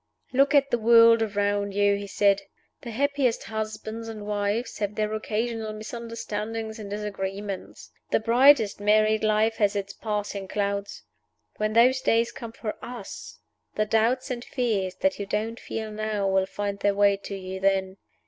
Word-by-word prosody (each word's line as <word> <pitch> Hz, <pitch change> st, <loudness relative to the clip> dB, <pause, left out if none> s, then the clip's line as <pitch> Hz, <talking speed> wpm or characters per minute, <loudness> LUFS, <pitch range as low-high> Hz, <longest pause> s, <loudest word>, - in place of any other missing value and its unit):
"Look 275 Hz, +3 st, +4 dB
at 275 Hz, -1 st, +4 dB
the 240 Hz, -, +2 dB
world 230 Hz, 0 st, +7 dB
around 205 Hz, -1 st, 0 dB
you," 205 Hz, 0 st, +3 dB
he 200 Hz, 0 st, -5 dB
said. 200 Hz, 0 st, +3 dB, 0.4 s
"The 235 Hz, -, -7 dB
happiest 270 Hz, 0 st, 0 dB
husbands 220 Hz, +1 st, -5 dB
and 215 Hz, -2 st, -7 dB
wives 210 Hz, +3 st, -2 dB
have 205 Hz, 0 st, -2 dB
their 215 Hz, 0 st, -1 dB
occasional 220 Hz, 0 st, -2 dB
misunderstandings 220 Hz, 0 st, -5 dB
and 205 Hz, -2 st, -7 dB
disagreements; 200 Hz, -1 st, -5 dB, 0.2 s
the -, -, +2 dB
brightest 235 Hz, -1 st, +5 dB
married 215 Hz, +1 st, +3 dB
life 215 Hz, +1 st, +2 dB
has 205 Hz, -1 st, +2 dB
its 200 Hz, -1 st, -3 dB
passing 205 Hz, -2 st, -4 dB
clouds. 200 Hz, -, -3 dB, 0.5 s
When 215 Hz, 0 st, -1 dB
those 255 Hz, +3 st, +5 dB
days 230 Hz, -1 st, +2 dB
come 230 Hz, -1 st, -8 dB
for 215 Hz, -2 st, -6 dB
us, 240 Hz, -5 st, -8 dB, 0.3 s
the 215 Hz, -, +1 dB
doubts 230 Hz, +5 st, +1 dB
and 240 Hz, -1 st, -4 dB
fears 205 Hz, -9 st, -1 dB
that 190 Hz, +1 st, +1 dB
you 200 Hz, -, -4 dB
don't 220 Hz, +3 st, -2 dB
feel 220 Hz, -1 st, -5 dB
now 215 Hz, -2 st, -2 dB
will 190 Hz, 0 st, +2 dB
find 200 Hz, 0 st, -4 dB
their 200 Hz, 0 st, +1 dB
way 200 Hz, 0 st, +4 dB
to 200 Hz, 0 st, -7 dB
you 190 Hz, 0 st, -6 dB
then. 190 Hz, 0 st, +1 dB
215 Hz, 160 wpm, -26 LUFS, 200-230 Hz, 0.5 s, world